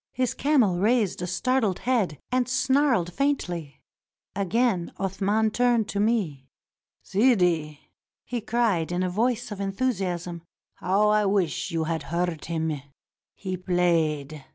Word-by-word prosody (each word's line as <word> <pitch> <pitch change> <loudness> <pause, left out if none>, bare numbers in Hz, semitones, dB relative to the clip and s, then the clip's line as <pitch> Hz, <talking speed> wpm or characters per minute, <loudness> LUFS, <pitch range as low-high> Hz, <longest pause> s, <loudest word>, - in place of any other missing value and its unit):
His 255 -1 0
camel 250 -11 +2
raised 215 -2 +1
a 180 - -2
startled 220 +1 0
head 220 - 0
and 255 0 +1
snarled 260 - +2
faintly. 175 - -2 0.5
Again 200 -1 0
Athman 200 +3 0
turned 240 -3 +2
to 200 - -2
me. 190 - 0 0.3
" - - -57
Sidi," 180 - +2 0.4
he 240 -1 -3
cried 220 -8 0
in 180 +1 0
a 180 - -1
voice 235 +3 0
of 200 -1 -5
enthusiasm, 190 -5 -2 0.3
"how 200 +3 +1
I 210 -1 +3
wish 190 -6 0
you 165 -2 -1
had 160 0 -2
heard 170 -1 -2
him. 160 -3 -2 0.5
He 185 -2 -4
played! 165 -5 0
195 Hz, 130 wpm, -26 LUFS, 170-235 Hz, 0.5 s, I